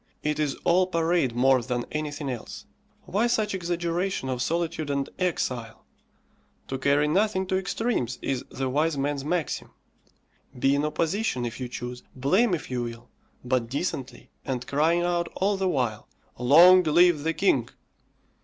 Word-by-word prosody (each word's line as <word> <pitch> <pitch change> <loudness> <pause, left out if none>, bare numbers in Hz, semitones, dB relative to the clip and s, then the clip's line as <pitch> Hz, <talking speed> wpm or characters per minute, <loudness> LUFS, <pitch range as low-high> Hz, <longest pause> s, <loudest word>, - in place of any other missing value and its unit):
It 150 0 -1
is 150 -3 0
all 180 +2 +3
parade 165 -7 +1
more 130 +1 +4
than 120 0 -3
anything 150 -1 -4
else. 125 -4 -6 0.4
Why 215 +5 0
such 215 -3 0
exaggeration 175 -3 -2
of 125 -1 -2
solitude 165 0 -1
and 140 -1 -1
exile? 125 -10 -2 0.8
to 135 - -3
carry 140 +2 +3
nothing 190 +3 +1
to 185 - -1
extremes 190 - -2
is 135 -2 -2
the 135 0 -3
wise 150 +3 +1
man's 140 0 -1
maxim. 165 +1 -2 0.9
Be 135 +2 +3
in 145 +1 +1
opposition 155 - -1
if 120 +1 -5
you 125 - -3
choose, 125 +1 -6
blame 180 - +2
if 150 - -8
you 125 -1 -1
will, 120 0 -7 0.4
but 125 -2 0
decently, 140 -1 -4
and 125 -2 -3
crying 160 +6 +2
out 175 -1 0
all 200 +2 +1
the 190 -1 0
while 125 -9 -1 0.3
"Long 170 +9 +7
live 170 -1 +4
the 165 +2 -1
King." 140 - +2
150 Hz, 155 wpm, -26 LUFS, 130-175 Hz, 0.9 s, Long